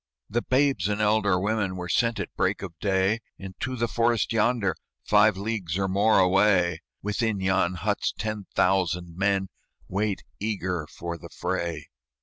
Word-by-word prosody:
"The 120 +3 +1
babes 130 -8 +2
and 105 0 -1
elder 105 -3 +3
women 100 -1 0
Were 90 -1 -5
sent 115 +6 +1
at - - -5
break - - 0
of 90 -4 -6
day 95 +2 +1 0.2
Into 95 +7 -5
the 120 -1 0
forest 115 0 +1
yonder, 110 -5 +2 0.3
Five 105 -1 +4
leagues 100 -5 -2
or 95 -1 0
more 100 +3 +3
away: 95 -3 +3 0.2
Within 105 0 0
yon 95 -1 +1
huts 105 +3 -1
ten 110 -2 -4
thousand 90 -2 +1
men 95 0 +1 0.4
Wait 100 +1 -1 0.2
eager 95 -7 -2
for 85 +2 -6
the - - -10
fray." 85 -4 -3
100 Hz, 150 wpm, -26 LUFS, 90-110 Hz, 0.4 s, Five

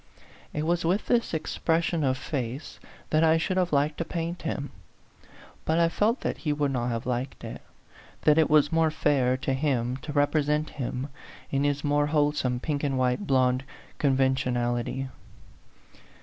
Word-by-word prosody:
It 150 +1 -2
was 175 +1 +1
with 180 +6 +1
this 235 -1 +1
expression 165 +1 0
of 130 -1 +1
face 130 0 -4 0.3
that 155 +1 +4
I 160 0 +5
should 185 +3 -1
have 180 -1 +1
liked 145 +1 +1
to - - +1
paint 170 +1 -4
him; 145 -3 -3 0.9
but 160 - +1
I 170 0 +4
felt 220 +8 +1
that - - -2
he 150 - -1
would 145 -1 0
not 120 -2 -1
have 115 -1 -3
liked 125 +2 -3
it, - - -7 0.6
that 150 +1 +5
it 160 - +4
was 150 -1 +4
more 165 -1 +3
fair 135 -4 +2
to 135 +1 -1
him 130 -3 0
to 150 - -7
represent 150 +1 +1
him 130 +1 -4 0.4
in 140 0 +1
his 145 0 0
more 145 0 +2
wholesome 145 -4 +1
pink 145 +2 -2
and 135 -2 0
white 130 +9 0
blond 130 -1 +3 0.4
conven 135 -2 +3
tionality. 120 0 -1
145 Hz, 165 wpm, -27 LUFS, 130-160 Hz, 0.9 s, I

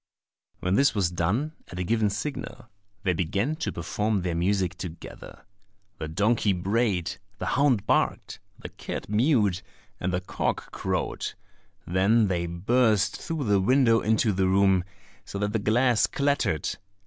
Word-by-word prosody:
When 90 +1 0
this 135 +4 +3
was 95 -4 +1
done, 100 - 0 0.2
at 90 - -9
a 90 - -1
given 110 +2 +1
signal, 120 +2 -5 0.4
they 90 - +2
began 100 - -1
to 165 - -2
perform 105 +3 -1
their 90 -1 -1
music 90 +1 0
together: 85 -2 -9 0.5
the 80 - -4
donkey 105 +5 +2
brayed, 95 -1 0 0.2
the - - -4
hound 130 -6 +2
barked, - - 0 0.2
the - - -8
cat - - -7
mewed, 105 - +2 0.4
and 90 - -1
the 90 - 0
cock 90 - -3
crowed; - - -2 0.5
then 100 +4 +3
they 85 -2 -1
burst 105 +4 +2
through 160 -3 -4
the 100 -4 +2
window 115 +1 +4
into 110 0 +2
the 95 0 +1
room, 95 -1 +3 0.4
so - - -7
that 105 +1 -1
the 110 - +1
glass 120 +3 +3
clattered! 140 - 0
100 Hz, 150 wpm, -26 LUFS, 90-115 Hz, 0.5 s, window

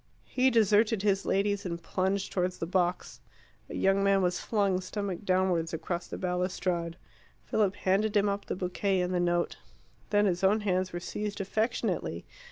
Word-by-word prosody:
He 260 +1 +2
deserted 220 -2 +3
his 195 -2 +1
ladies 200 +1 +1
and 170 -2 -4
plunged 190 +3 -1
towards 180 -1 -1
the - - -3
box. 180 0 -1 0.5
A - - -6
young 195 +1 +2
man 195 -1 +3
was 180 0 +1
flung 200 -4 +1
stomach 195 0 -4
downwards 185 -3 +1
across 170 +2 -4
the - - -6
balustrade. 180 -2 -2 0.5
Philip 200 -3 +1
handed 205 +2 +1
him 205 0 +3
up 200 0 -2
the - - -3
bouquet 185 +1 0
and 180 +1 -1
the 180 - +1
note. 175 0 0 0.5
Then 205 0 +3
his 185 -1 0
own 205 +3 +4
hands 185 -2 0
were 175 - -4
seized 205 +3 -4
affectionately. 215 +4 -1
190 Hz, 170 wpm, -29 LUFS, 180-205 Hz, 0.5 s, own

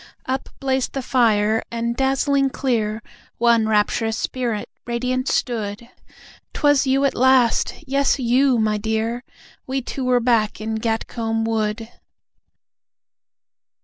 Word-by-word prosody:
Up 265 +1 -3
blazed 265 -2 -1
the 270 - -3
fire, 220 -4 +2
and, 235 0 -2
dazzling 270 +1 +1
clear, 225 -5 -1 0.3
One 235 -2 +3
rapturous 220 +1 +1
Spirit 235 -5 -3 0.2
radiant 255 +2 -1
stood. 230 0 -2 0.6
'Twas 290 -2 +3
you 270 +1 +2
at 275 - +1
last! 255 -2 +3
Yes, 275 +1 +1
YOU, 255 +1 +2
my 215 -1 +1
dear. 220 +3 -2 0.4
We 265 0 -2
two 265 - -5
were 250 -1 +3
back 230 -4 +1
in 220 0 -3
Gatcombe 225 0 -2
Wood! 220 0 -1
235 Hz, 115 wpm, -21 LUFS, 220-260 Hz, 0.6 s, One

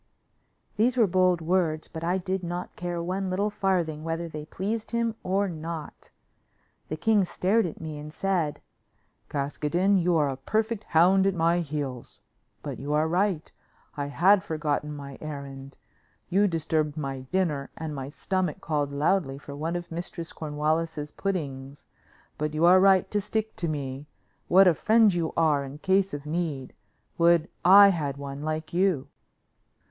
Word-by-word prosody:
These 240 +4 +2
were 230 - +6
bold 185 -2 +2
words, 160 -2 0
but 160 - -8
I 175 +3 +1
did 190 0 -2
not 175 +1 -5
care 175 -1 -3
one 185 +2 -2
little 200 +3 0
farthing 175 -6 -1
whether 165 +1 -3
they 150 -2 -7
pleased 215 +6 -3
him 235 -1 0
or 195 +2 0
not. 165 -2 -7 0.8
The 155 - -4
king 210 +4 +3
stared 190 +3 +1
at 165 - -8
me 155 -2 -6
and 150 +1 -8
said: 175 -4 -1 0.7
"Caskoden, 150 +7 +1
you 175 0 +2
are 150 -2 +2
a 135 - -4
perfect 215 - -1
hound 185 +4 +4
at 195 - +1
my 170 +1 +2
heels. 145 -6 -5 0.5
But - - -5
you 145 +2 -3
are 155 +1 +2
right; 180 -1 0 0.4
I 145 -1 -3
had 185 +7 +4
forgotten 150 -3 -2
my 140 -2 -9
errand. 140 -2 -8 0.5
You 200 +3 +3
disturbed 155 -3 -1
my 135 -3 -3
dinner, 160 -7 0
and 160 -1 -5
my 135 -1 -5
stomach 185 +2 -2
called 145 -3 -1
loudly 140 -1 +1
for 140 0 -9
one 160 +4 -3
of 175 0 -5
Mistress 170 0 -5
Cornwallis's 155 0 -2
puddings; 140 -8 -4 0.5
but 150 0 -2
you 160 +2 +3
are 180 +2 +7
right 190 -1 +5
to 210 - +1
stick 220 +2 -3
to 170 - -2
me. 140 -2 -4 0.4
What 190 +1 +6
a 175 - +6
friend 220 +4 +4
you 170 -2 -1
are 155 -4 +3
in 135 +1 -8
case 190 +4 +2
of 145 0 -6
need. 150 -4 -3 0.5
Would 170 -1 +4
I 200 +3 +9
had 145 -7 -2
one 140 0 -6
like 155 +1 -4
you." 175 -7 +1
165 Hz, 165 wpm, -27 LUFS, 150-190 Hz, 0.8 s, I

